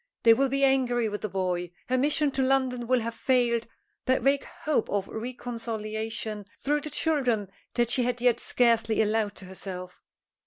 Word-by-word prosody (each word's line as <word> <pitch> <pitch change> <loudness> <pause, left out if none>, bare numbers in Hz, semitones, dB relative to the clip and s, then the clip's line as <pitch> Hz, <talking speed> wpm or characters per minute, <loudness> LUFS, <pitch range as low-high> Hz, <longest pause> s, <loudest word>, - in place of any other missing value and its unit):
They 230 - +8
will 270 +3 +2
be 275 +1 0
angry 250 -4 +3
with 210 0 -4
the 215 - -3
boy. 180 -2 -1 0.2
Her 255 - +1
mission 290 +1 +2
to 270 - -1
London 260 -2 +1
will 255 -1 +3
have 230 +1 -3
failed 240 -3 +1 0.4
that 260 -2 +2
vague 275 +1 +2 0.2
hope 300 -6 +1
of 200 -1 -1
a - - -10
reconciliation 220 -3 -4
through 295 +3 0
the 300 - -5
children 255 - +1 0.2
that 240 -1 +2
she 250 - +3
had 245 0 0
yet 240 -1 +3
scarcely 230 -2 +2
allowed 215 -1 0
to 195 - -9
herself. 185 -1 -8
240 Hz, 180 wpm, -27 LUFS, 215-260 Hz, 0.4 s, They